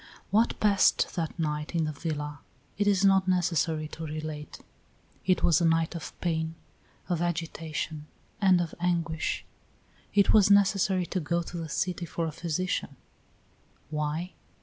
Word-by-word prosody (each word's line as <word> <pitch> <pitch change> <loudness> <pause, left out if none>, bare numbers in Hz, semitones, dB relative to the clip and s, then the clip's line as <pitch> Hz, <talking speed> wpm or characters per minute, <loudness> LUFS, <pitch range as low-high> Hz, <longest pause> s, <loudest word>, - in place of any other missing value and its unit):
What 225 +3 +2
passed 205 -2 +3
that 165 -2 -3
night 150 0 -2
in 165 -1 +2
the 155 - -2
villa 150 -1 -4 0.4
it 205 +1 0
is 200 -1 +4
not 190 -1 +4
necessary 165 -4 +1
to 165 - -7
relate; 155 -1 -6 0.7
it 185 - +3
was 165 -1 +4
a - - +3
night 165 0 +2
of 170 -2 -8
pain, 160 -2 -1 0.5
of 175 -3 -1
agitation, 160 -2 -3 0.3
and 190 -3 +5
of 170 -2 -4
anguish. 170 -3 -1 0.7
It 200 -1 +5
was 205 -2 +6
necessary 195 -2 +4
to 185 - -2
go 170 +1 -1
to 175 - -7
the 165 -2 -5
city 180 +1 -2
for 165 +1 -2
a 160 - -2
physician; 170 +3 -2 1.0
why? 155 +4 -2
170 Hz, 150 wpm, -28 LUFS, 155-185 Hz, 1.0 s, was